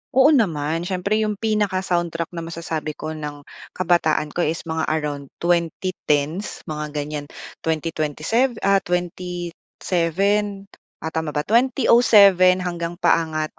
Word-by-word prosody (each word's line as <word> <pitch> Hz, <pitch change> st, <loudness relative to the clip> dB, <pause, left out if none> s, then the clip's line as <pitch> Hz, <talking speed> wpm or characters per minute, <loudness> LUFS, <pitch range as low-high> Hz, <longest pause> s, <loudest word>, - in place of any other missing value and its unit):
Oo 265 Hz, +4 st, +6 dB
naman, 165 Hz, -, +1 dB
siyempre 200 Hz, +3 st, 0 dB
yung 215 Hz, -1 st, 0 dB
pinaka-soundtrack 185 Hz, -6 st, -1 dB
na 170 Hz, -, -6 dB
masasabi 165 Hz, -2 st, -4 dB
ko 155 Hz, -, -5 dB
ng 150 Hz, -2 st, -7 dB, 0.3 s
kabataan 165 Hz, -4 st, +1 dB
ko -, -, -5 dB
is 165 Hz, -1 st, 0 dB
mga 160 Hz, -1 st, -2 dB
around 150 Hz, -3 st, -2 dB, 0.2 s
2010s, 170 Hz, -1 st, -1 dB
mga 150 Hz, -2 st, -6 dB
ganiyan, 145 Hz, 0 st, -3 dB, 0.3 s
twenty 160 Hz, 0 st, -2 dB
twenty 155 Hz, -1 st, -3 dB
sev 240 Hz, +6 st, +2 dB
ah, 195 Hz, 0 st, +4 dB
27 180 Hz, +3 st, -2 dB, 0.4 s
ah, 160 Hz, -, -3 dB
tama 160 Hz, -2 st, -3 dB
ba? 150 Hz, -, 0 dB
2007 210 Hz, -6 st, +5 dB
hanggang 175 Hz, -1 st, -3 dB
paangat 155 Hz, -2 st, +1 dB
170 Hz, 125 wpm, -22 LUFS, 155-195 Hz, 0.4 s, Oo